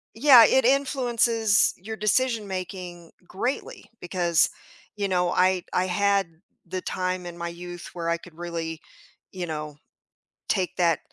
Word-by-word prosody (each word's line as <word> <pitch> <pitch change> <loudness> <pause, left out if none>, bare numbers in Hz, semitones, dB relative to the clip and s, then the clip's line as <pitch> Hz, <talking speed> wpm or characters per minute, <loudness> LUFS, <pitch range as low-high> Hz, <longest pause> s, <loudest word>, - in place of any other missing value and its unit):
Yeah, 245 -2 +8
it 265 -2 +3
influences 240 -5 +2
your 220 +4 -7
decision 220 +1 +1
making 180 -2 -7
greatly 240 +6 -4
because, 175 -2 +1 0.5
you 200 -1 -1
know, 180 -1 +1
I 185 0 +2
I 185 - +1
had 200 +1 +2 0.4
the 185 +2 -4
time 185 -1 -3
in 175 - -8
my 170 0 -3
youth 175 0 -9
where 170 -1 -4
I 170 - +2
could 170 -1 -15
really, 165 -2 -5 0.5
you 180 -2 -4
know, 150 -2 -5 0.7
take 185 -3 0
that 170 -4 +2
185 Hz, 140 wpm, -25 LUFS, 175-215 Hz, 0.7 s, Yeah